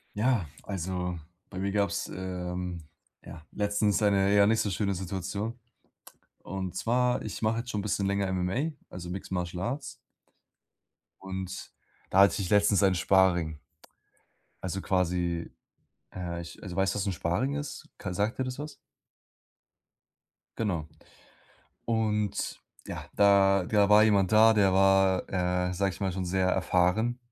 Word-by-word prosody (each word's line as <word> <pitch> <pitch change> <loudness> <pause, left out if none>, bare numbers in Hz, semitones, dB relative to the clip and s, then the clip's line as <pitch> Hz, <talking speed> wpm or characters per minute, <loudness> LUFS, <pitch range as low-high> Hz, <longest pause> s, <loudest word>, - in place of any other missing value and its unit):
Ja, 110 - +1 0.2
also, 90 -2 -3 0.3
bei 95 - -7
mir 100 +1 -1
gab's, 100 0 0
ähm, 90 -2 -4 0.4
ja, 80 - -11
letztens 105 0 +1
eine, 100 -1 +3
ja, 100 0 +6
nicht 110 +1 +3
so 105 - -1
schöne 100 0 -1
Situation, 100 +5 -4 0.8
und 95 -1 -5
zwar, 125 +5 +1
ich - - -6
mache 110 +1 +1
jetzt 120 +1 -5
schon 105 - -2
'n - - -4
bisschen 100 -1 -1
länger 100 0 0
MMA, 95 - -1 0.2
also 90 -1 -7
Mixed 95 +2 -6
Martial 90 -1 -3
Arts 130 +8 -2 1.4
und 95 -1 -6 0.4
da 95 - +3
hatte 100 0 +4
ich 90 - -3
letztens 105 -1 +4
ein 95 -1 +4
Sparring. 85 -4 +2 1.0
Also 95 +1 -3
quasi, 90 -2 -1 0.6
äh, 85 -2 -4
ich 85 0 -11
also, 95 -4 -7
weißt 95 0 +1
du - - -2
was 100 - -1
'n 95 - 0
Sparring 100 - -1
ist? 145 0 -6
K 95 - -5
sagt 105 +7 -1
dir - - +2
das 130 +1 -5
was? 150 0 -6 1.8
Genau. 90 -9 -1 1.0
Und 105 -3 -1 0.3
ja, - - -6
da 100 -2 +5
da 105 +1 +3
war 105 +1 +7
jemand 100 -4 +3
da, 110 +1 +7
der 100 -3 +4
war, 95 -1 +4
äh, 90 0 0
sage 95 +2 0
ich - - -12
mal, 95 -2 -1
schon 95 0 -3
sehr 95 +1 +1
erfahren. 95 +7 +1
95 Hz, 150 wpm, -28 LUFS, 90-105 Hz, 1.8 s, war